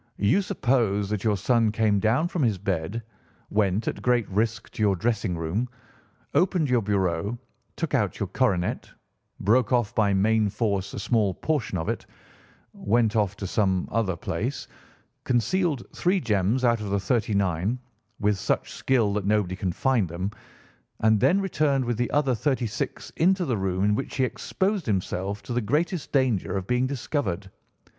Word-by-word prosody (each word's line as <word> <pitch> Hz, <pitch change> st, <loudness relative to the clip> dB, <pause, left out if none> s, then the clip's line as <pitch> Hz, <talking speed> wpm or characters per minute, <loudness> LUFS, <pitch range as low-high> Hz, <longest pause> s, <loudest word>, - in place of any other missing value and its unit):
You 105 Hz, -, +3 dB
suppose 110 Hz, -, 0 dB
that 105 Hz, -2 st, -2 dB
your 105 Hz, -3 st, +2 dB
son 115 Hz, +2 st, +2 dB
came 105 Hz, -2 st, +2 dB
down 115 Hz, -, +2 dB
from 175 Hz, -2 st, -3 dB
his 110 Hz, -7 st, +2 dB
bed, 95 Hz, +3 st, -2 dB, 0.5 s
went, 105 Hz, 0 st, +1 dB
at -, -, -2 dB
great 125 Hz, -2 st, +2 dB
risk, 110 Hz, +3 st, -1 dB
to -, -, -6 dB
your 100 Hz, -2 st, +3 dB
dressing 105 Hz, -3 st, -1 dB
room, 90 Hz, +10 st, -2 dB, 0.6 s
opened 175 Hz, -6 st, +2 dB
your 125 Hz, -2 st, +4 dB
bureau, 100 Hz, +1 st, 0 dB, 0.4 s
took 165 Hz, -3 st, -3 dB
out 110 Hz, -9 st, +1 dB
your 100 Hz, -, 0 dB
coronet, 95 Hz, -3 st, 0 dB, 0.5 s
broke 115 Hz, +2 st, +3 dB
off 120 Hz, -4 st, +2 dB
by 105 Hz, -2 st, +2 dB
main 110 Hz, +2 st, +3 dB
force 100 Hz, -2 st, -1 dB
a -, -, -4 dB
small 105 Hz, -6 st, +1 dB
portion 120 Hz, -2 st, -1 dB
of 80 Hz, -, -3 dB
it, -, -, -3 dB, 0.7 s
went 115 Hz, +1 st, +1 dB
off 105 Hz, -3 st, +1 dB
to 100 Hz, -, -6 dB
some 95 Hz, -1 st, +1 dB
other 105 Hz, -6 st, 0 dB
place, -, -, -3 dB, 0.6 s
concealed 135 Hz, -, +1 dB
three 185 Hz, +2 st, +2 dB
gems 110 Hz, -, +1 dB
out 115 Hz, -2 st, +3 dB
of 105 Hz, -, -4 dB
the 100 Hz, 0 st, +1 dB
thirty 110 Hz, +1 st, 0 dB
nine, 95 Hz, +4 st, 0 dB, 0.4 s
with 105 Hz, -1 st, +1 dB
such -, -, -1 dB
skill 115 Hz, -6 st, +1 dB
that 100 Hz, -1 st, -2 dB
nobody 105 Hz, -3 st, +1 dB
can 95 Hz, -1 st, -2 dB
find 115 Hz, -1 st, +1 dB
them, 90 Hz, +4 st, -3 dB, 0.7 s
and 110 Hz, -1 st, +4 dB
then 185 Hz, -, +4 dB
returned 150 Hz, -8 st, +1 dB
with 120 Hz, -2 st, -1 dB
the 120 Hz, 0 st, 0 dB
other 145 Hz, -3 st, +2 dB
thirty 130 Hz, +1 st, 0 dB
six 105 Hz, -, -4 dB
into 185 Hz, +2 st, +3 dB
the 130 Hz, -6 st, 0 dB
room 95 Hz, -2 st, -1 dB
in 105 Hz, +1 st, +3 dB
which 135 Hz, -, -3 dB
he 130 Hz, -, +1 dB
exposed 190 Hz, -, -1 dB
himself 100 Hz, 0 st, -2 dB
to 120 Hz, -, -5 dB
the 125 Hz, -, +1 dB
greatest 155 Hz, -, -1 dB
danger 125 Hz, -8 st, +1 dB
of 95 Hz, -, -3 dB
being 125 Hz, +4 st, +1 dB
discovered. 125 Hz, -, -3 dB
110 Hz, 170 wpm, -26 LUFS, 100-125 Hz, 0.7 s, your